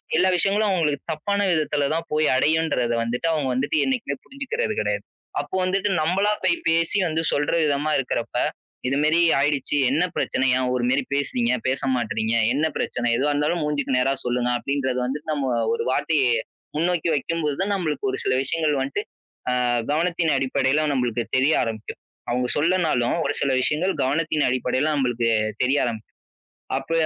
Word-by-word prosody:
எல்லா 185 +3 +4
விஷயங்களும் 205 +4 +2
அவங்களுக்கு 155 -6 +1
தப்பான 200 +7 -1
விதத்தில 150 -3 +1
தான் 165 +1 -2
போய் 155 0 +2
அடையுன்றத 145 -5 +1
வந்துட்டு 125 +8 -2
அவங்க 150 -4 0
வந்துட்டு 140 +4 0
என்னைக்குமே 260 -3 -1
புரிஞ்சுக்கிறது 435 - -3
கெடையாது. - - -1 0.4
அப்போ - - -7
வந்துட்டு 195 +2 0
நம்மளா 195 +6 +2
போய் 345 - +3
பேசி 165 +3 +2
வந்து 160 +1 -1
சொல்ற 145 0 0
விதமா 145 +1 0
இருக்கறப்ப, 120 -3 -3 0.5
இதுமாரி 150 +4 +2 0.2
ஆயிடுச்சு. 145 0 +1
என்ன 155 +6 +2
பிரச்சனை. 130 - 0
ஏன் 130 -1 0
ஒருமாரி 125 +2 +1
பேசுனீங்க? 125 -3 0
பேச 130 +1 0
மாட்றீங்க? 110 -1 -1 0.2
என்ன 150 +4 +1
பிரச்சன? 120 -1 -1
எதுவா 145 +3 +1
இருந்தாலும் 150 +3 0
மூஞ்சுக்கு 145 -3 0
நேரா 135 +2 +2
சொல்லுங்க. 125 0 0
அப்டின்றத 130 -1 -2
வந்துட்டு 150 +4 -4
நம்ம 135 -3 -1 0.2
ஒரு - - -1
வாட்டி 160 +3 +1 0.6
முன்னோக்கி 170 0 +1
வெக்கும்போது 150 0 -2
தான் 200 +1 0
நம்மளுக்கு 150 -7 -2
ஒரு - - -4
சில - - +1
விஷயங்கள் 155 +1 0
வன்ட்டு, 135 +1 -2 0.5
அ - - +1 0.4
கவனத்தின் 165 0 +1
அடிப்படைல 135 +3 +1
நம்மளுக்கு 120 -3 -1
தெரிய 140 +4 +3
ஆரம்பிக்கும். 110 -2 -6 0.3
அவங்க 125 +1 0
சொல்லனாலும், 160 -7 +1
ஒரு 145 - 0
சில 140 - +2
விஷயங்கள் 170 +8 +1
கவனத்தின் 150 +2 +1
அடிப்படைல 130 +2 0
நம்மளுக்கு 120 -4 0 0.3
தெரிய 135 +3 +2
ஆரம்பிக்கும். 110 -2 -6 0.6
அப்ப 135 +4 -10
145 Hz, 155 wpm, -23 LUFS, 130-165 Hz, 0.6 s, எல்லா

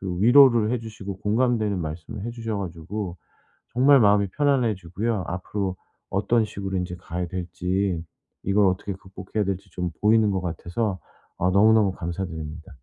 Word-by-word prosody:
그 95 -2 -4
위로를 120 -1 +6
해 125 - +1
주시고 100 -4 -7
공감되는 110 -2 +1
말씀을 80 +5 -6
해 120 - -3
주셔 115 -3 -4
가지고 90 +1 -5 0.6
정말 135 +3 +6
마음이 100 -2 +4
편안해지고요 115 - 0
앞으로 95 +1 -3 0.3
어떤 110 +4 +2
식으로 95 -2 -4
인제 90 0 -4
가야 90 +1 -4
될지 90 0 -2 0.4
이걸 100 +1 +3
어떻게 95 +2 -1
극복해야 95 +2 -4
될지 95 -1 -4
좀 90 -1 -3
보이는 110 0 +4
것 95 -1 0
같아서 90 +4 -2 0.4
아 90 - +2
너무너무 105 0 +5
감사드립니다. 80 -3 -5
100 Hz, 355 characters per minute, -24 LUFS, 90-110 Hz, 0.6 s, 위로를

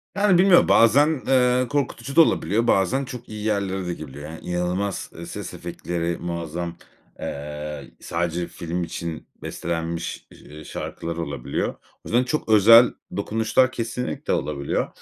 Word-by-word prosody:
Yani, 200 -2 +4
bilmiyorum, 185 0 +6
bazen, 140 +6 +5
eee, 125 -1 +3
korkutucu 140 -2 -2
da 165 - +9
olabiliyor, 115 - +2
bazen 125 +9 +2
çok 125 -2 -9
iyi 105 -1 -6
yerlere 100 -3 -1
de 90 - -1
gelebiliyor. 75 -1 -8
Yani, 80 - -8
inanılmaz, 90 +3 -2
eee, 85 - -7
ses - - -7
efektleri 85 -1 -3
muazzam. 85 0 -4 0.4
Eee, 75 0 -6
sadece 85 0 -2
film 85 +1 -4
için 85 -1 -5 0.2
bestelenmiş, 85 0 -4
eee, 75 +1 -12
şarkılar 85 +2 -5
olabiliyor. 70 -6 -2
O - - -20
yüzden 120 +2 +3
çok 140 0 -2
özel 115 +3 +8 0.2
dokunuşlar 110 +5 +2
kesinlikle 125 0 -3
olabiliyor 70 -1 -1
95 Hz, 135 wpm, -23 LUFS, 85-125 Hz, 0.4 s, da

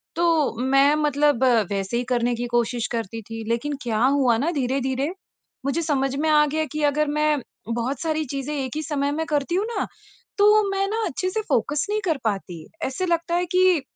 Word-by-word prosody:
तो 330 -5 +2
मैं 275 +3 +4
मतलब 295 -3 +2 0.3
वैसे 195 +3 -1
ही 245 - 0
करने 245 -1 +1
की 240 +1 -3
कोशिश 240 0 0
करती 230 -1 -3
थी। 225 +1 -7
लेकिन 240 +6 -1
क्या 225 -3 -1
हुआ 265 -4 +3
न 300 +8 0
धीरे-धीरे 265 +1 -1 0.6
मुझे 280 +5 0
समझ 270 -4 0
में 315 - +1
आ 300 -1 +5
गया 310 +2 -1
कि 305 0 -3
अगर 295 +1 +2
मैं 300 0 +1 0.3
बहुत 245 +3 -2
सारी 315 -1 0
चीज़ें 275 +2 -3
एक 265 -2 -3
ही 310 - -1
समय 285 -2 -1
में 320 +2 -2
करती 295 +2 -1
हूँ 395 +3 +1
ना, 465 0 -2 0.5
तो 420 +1 +6
मैं 390 0 0
न 450 0 0
अच्छे 365 +7 -2
से 440 +4 -2
फ़ोकस 295 +3 +1
नहीं 425 +1 0
कर 320 -5 +1
पाती। 195 -6 -3 0.2
ऐसे 270 +8 -2
लगता 340 0 0
है 355 +1 +1
कि 365 -4 +4
285 Hz, 200 wpm, -23 LUFS, 250-320 Hz, 0.6 s, तो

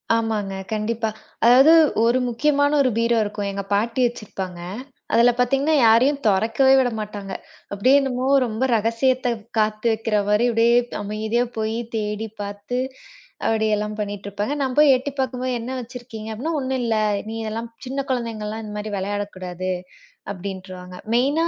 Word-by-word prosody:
ஆமாங்க 215 -4 -1 0.2
கண்டிப்பா. 220 +1 -1 0.4
அதாவது 265 +6 +7 0.3
ஒரு 240 +2 +3
முக்கியமான 285 +4 +2
ஒரு 255 - +3
பீரோ 230 0 +2
இருக்கும். 205 -1 -3
எங்க 200 0 -4
பாட்டி 230 +5 0
வச்சிருப்பாங்க. 195 -6 -6 0.5
அதுல 240 +1 +6
பார்த்தீங்கன்னா 275 +5 +2
யாரையும் 260 +6 +4
தொறக்கவே 225 +7 +3
விடமாட்டாங்க. 210 -5 -3 0.4
அப்படியே 250 +8 +4
என்னவோ 260 -1 -1 0.2
ரொம்ப 225 +2 -3
ரகசியத்தை 240 +3 +1 0.3
காத்து 215 +1 0
வைக்கிற 220 -1 0
மாரி 210 +3 +3
அப்படியே 230 +1 +3 0.3
அமைதியா 215 +3 -1
போய் 220 +1 -1 0.2
தேடிப் 215 0 -3
பார்த்து 205 +4 -4 0.7
அப்படி 220 -1 +1
எல்லாம் 210 0 -3
பண்ணிட்டு 205 -1 -4
இருப்பாங்க. 205 +6 -2
நான் 260 -2 -1
போய் 295 -3 +7
எட்டிப்பாக்கும்போது 260 -1 -3
என்ன 250 +3 -5
வச்சிருக்கீங்க 235 -3 -8
அப்படின்னா, 310 +9 -3
"ஒண்ணும் 260 0 -1
இல்ல. 225 -1 +1 0.3
நீங்க 225 0 -4
இதல்லாம் 230 +2 -4 0.2
சின்னக் 270 +2 -4
குழந்தைங்கல்லாம் 225 -3 -3
இந்த 210 -1 -7
மாரி 210 0 -5
வெளையாடக் 205 +1 -3
கூடாது" 185 0 -4 0.6
அப்படின்றுவாங்க. 185 -1 -8 0.2
மெயின்னா 285 +7 +2
225 Hz, 140 wpm, -22 LUFS, 210-255 Hz, 0.7 s, அதாவது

